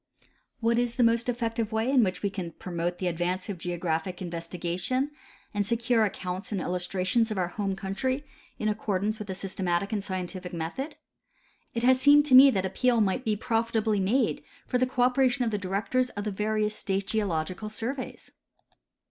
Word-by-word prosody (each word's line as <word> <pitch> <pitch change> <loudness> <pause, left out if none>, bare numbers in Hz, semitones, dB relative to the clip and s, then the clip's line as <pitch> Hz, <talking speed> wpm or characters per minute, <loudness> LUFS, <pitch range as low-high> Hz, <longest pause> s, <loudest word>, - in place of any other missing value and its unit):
What 230 +1 +3
is 240 -1 -1
the 250 - +3
most 230 +1 +3
effective 230 -2 -1
way 220 +2 0
in 260 -3 +5
which 185 -1 -2
we 200 - +1
can. 180 -4 -5
promote 175 0 -3
the 185 - -4
advance 180 +3 -1
of 190 -4 -4
geographic 175 0 -2
investigation 175 - -2 0.4
and 205 -1 0
secure 235 0 +2
accounts 185 0 -4
and 200 - -1
illustrations 180 +5 0
of 215 - -3
our 180 -2 0
home 195 0 -2
country 255 +9 -2 0.3
iu 215 - -1
accordance 210 0 -1
with 210 -2 -7
a 190 - -2
system 190 0 -4
atic 175 +4 0
and 205 -2 -1
scientific 185 -1 -5
method? 180 - -4 0.8
It 230 - -1
has 260 +1 +5
seemed 290 +1 +7
to 285 - +1
me 265 +2 +11
that 190 -7 0
appeal 240 +5 +2
might 210 +4 +1
be 220 -3 +1
profitably 225 -1 0
made 210 +8 +1 0.2
for 250 - 0
the 255 - +3
cooperation 255 0 +2
of 225 - 0
the 210 - -1
directors 200 +7 0
of 205 - -5
the 210 - -2
various 210 +1 0
state 195 0 -2
geological 195 -1 -2
surveys. 245 +5 -5
210 Hz, 180 wpm, -28 LUFS, 185-235 Hz, 0.8 s, me